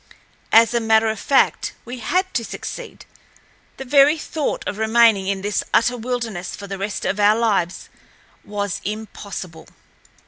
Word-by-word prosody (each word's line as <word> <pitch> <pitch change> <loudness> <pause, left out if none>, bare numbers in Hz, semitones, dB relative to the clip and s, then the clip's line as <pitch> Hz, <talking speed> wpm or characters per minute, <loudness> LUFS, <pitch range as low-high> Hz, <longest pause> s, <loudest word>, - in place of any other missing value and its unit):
As 230 +1 +6
a 235 - +2
matter 220 -1 +3
of 220 - -6
fact, 275 - +2
we 245 +1 -7
had 370 - -1
to 230 - 0
succeed. - - -8 0.7
The 270 - -7
very 285 +3 +5
thought 310 -1 -3
of 205 - -4
remaining 220 -3 +4
in 195 -1 -2
this 205 0 0
utter 245 +2 +3
wilderness 230 -6 -4
for 200 - -9
the 195 -1 -6
rest 200 +1 -3
of 205 - -1
our 205 +1 +5
lives 200 -7 0 0.6
was 205 -2 -4
impossible. 200 -5 -7
220 Hz, 150 wpm, -21 LUFS, 200-240 Hz, 0.7 s, As